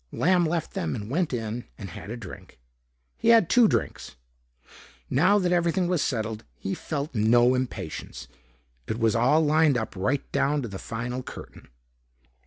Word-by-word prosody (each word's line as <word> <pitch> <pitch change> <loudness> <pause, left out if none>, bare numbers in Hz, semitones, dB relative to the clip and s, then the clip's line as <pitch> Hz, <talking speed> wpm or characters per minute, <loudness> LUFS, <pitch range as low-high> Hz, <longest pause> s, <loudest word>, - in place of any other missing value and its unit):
Lamb 175 -1 +2
left 165 0 -2
them 80 -3 -2
and 105 +3 -6
went 170 +2 0
in 115 -1 -4
and 100 -5 -8
had 85 - -9
a 115 - -5
drink. 105 -7 -11 0.6
He - - -2
had 230 -6 +6
two 240 -2 +6
drinks. - - -2 1.0
Now 180 +10 +4
that 180 -3 +1
everything 175 +1 +1
was 175 -4 +1
settled, 110 -4 -2
he 95 - -4
felt 150 -1 -4
no 120 +3 +4
impatience. 125 -11 -5 0.6
It 110 - -2
was 115 -2 +2
all 135 +7 +3
lined 155 -2 +4
up 110 -3 -4
right 130 +9 0
down 145 0 +1
to - - -3
the 100 -3 -7
final 125 +2 -4
curtain. - - -11
130 Hz, 165 wpm, -26 LUFS, 110-165 Hz, 1.0 s, had